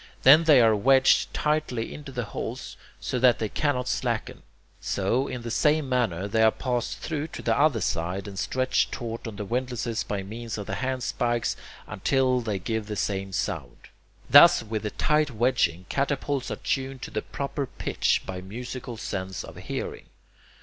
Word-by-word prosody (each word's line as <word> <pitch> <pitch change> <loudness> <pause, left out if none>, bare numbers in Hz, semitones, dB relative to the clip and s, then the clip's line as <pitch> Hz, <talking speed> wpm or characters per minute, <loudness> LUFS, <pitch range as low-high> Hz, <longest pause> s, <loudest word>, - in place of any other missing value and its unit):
Then 155 +5 +8
they 150 -5 +7
are 110 -2 +5
wedged 130 +5 +4
tightly 150 -7 -1
into 145 -2 -9
the 125 -2 -3
holes 105 - -6 0.2
so 125 - -2
that 125 -1 +5
they 110 - -2
cannot 130 -2 -1
slacken. 120 -4 -2 0.4
So, 120 +8 0
in 125 -2 -5
the 115 - -4
same 150 +3 +2
manner, 110 -8 0
they 110 +2 +1
are 110 - +7
passed 125 +1 -2
through 155 -1 -3
to - - -9
the - - +2
other 140 -6 +3
side, 90 +4 -2
and 95 -2 -6
stretched 130 0 0
taut 115 -1 -5
on 110 - -6
the 105 0 -5
windlasses 120 0 -2
by 100 -2 -3
means 115 +3 -6
of 105 - -5
the - - -5
handspikes 125 -2 -1 0.3
until 130 -2 +1
they 110 -4 -2
give 110 +3 -3
the 105 - -4
same 95 -1 -2
sound. 80 - -4 0.4
Thus - - +8
with 110 -1 -4
tight 150 0 +2
wedging, 110 -8 +1
catapults 140 -1 -1
are - - -2
tuned 135 -1 -3
to - - -6
the 110 - -2
proper 140 0 -4
pitch - - 0
by 90 -1 -5
musical 120 +4 -7
sense 95 -3 -4
of - - -11
hearing. - - -5
120 Hz, 170 wpm, -26 LUFS, 105-130 Hz, 0.4 s, Then